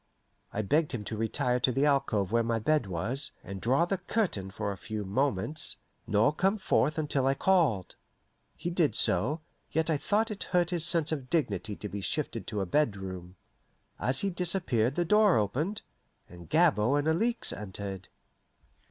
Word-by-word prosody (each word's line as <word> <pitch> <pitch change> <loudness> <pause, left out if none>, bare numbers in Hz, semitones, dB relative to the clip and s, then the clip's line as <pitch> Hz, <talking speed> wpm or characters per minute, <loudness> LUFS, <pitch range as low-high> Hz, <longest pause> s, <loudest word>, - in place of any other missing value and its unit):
I 110 - -2
begged 150 +8 +1
him 115 -4 -3
to 110 - -5
retire 115 +3 0
to 125 - +2
the 135 +3 +1
alcove 135 -9 +1
where 115 0 +3
my 115 0 0
bed 130 +2 +1
was, 115 - -3
and 95 0 -7
draw 135 +8 +2
the 190 +1 -2
curtain 180 - -1
for 100 +1 -3
a - - -5
few 105 +2 -5
moments, 135 +6 +1 0.3
nor 110 +7 +3
come 195 +6 +1
forth 155 -6 +1
until 145 -4 0
I 135 - +2
called. 150 - +1 0.6
He 175 +2 -4
did 170 -4 +1
so, 155 +4 +3 0.3
yet 160 +1 0
I 155 - +2
thought 215 +8 0
it 205 - -4
hurt 175 -1 +1
his 170 -2 +3
sense 165 -2 +2
of 135 -5 -4
dignity 105 - -1
to 105 - -6
be 100 0 -6
shifted 115 - -3
to 105 -2 -2
a - - -1
bedroom. 95 -7 -2 0.6
As 130 +2 +1
he 200 - 0
disappeared 170 - +1
the 175 - +1
door 210 +1 +4
opened, 140 - -1 0.4
and 85 0 -13
Gabord 145 -6 +3
and 145 +1 0
Alixe 225 +9 +1
entered. 95 -2 -6
135 Hz, 175 wpm, -29 LUFS, 105-165 Hz, 0.6 s, door